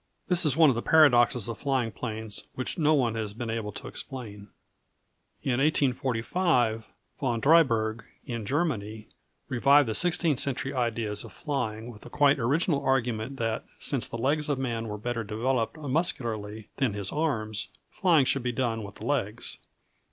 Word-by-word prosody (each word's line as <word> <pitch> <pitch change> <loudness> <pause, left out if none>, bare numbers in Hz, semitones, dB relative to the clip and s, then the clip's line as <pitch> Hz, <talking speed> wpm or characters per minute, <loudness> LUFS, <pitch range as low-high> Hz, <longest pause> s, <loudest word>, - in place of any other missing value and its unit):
This 180 -2 +3
is 150 - +2
one 160 -2 +7
of - - -2
the 120 - -1
paradoxes 125 -7 +5
of 115 - -5
flying 130 -5 0
planes 110 -3 -6
which 130 - -1
no 155 0 +4
one 120 -6 +1
has 110 -2 -4
been 115 0 -4
able 110 -2 -3
to - - -7
explain. 105 -6 -7 1.0
In 130 -2 0
1845, 130 -3 +1 0.3
Von 120 -4 0
Drieberg, 115 -7 +3 0.2
in 115 -3 -4
Germany, 110 -6 -2 0.4
revived 140 +2 +4
the 110 - -1
sixteenth 165 -1 +2
century 140 -1 0
ideas 115 -4 -1
of - - -11
flying, 120 -6 -3
with 105 - -14
the - - -11
quite 145 -1 +3
original 145 +5 +1
argument 125 -1 0
that 115 -2 -1
since 135 -5 0
the 115 - -6
legs 145 +5 0
of 145 - +1
man 115 -4 -2
were 105 -1 -4
better 115 +2 -3
developed 115 +5 -1
muscularly 120 - -2
than 130 -6 +1
his 100 -2 -3
arms, 110 -10 -1 0.2
flying 165 -7 +3
should 135 - +1
be 125 0 -1
done 120 -2 -1
with 100 -1 -9
the - - -9
legs. - - -2
120 Hz, 165 wpm, -27 LUFS, 110-140 Hz, 1.0 s, one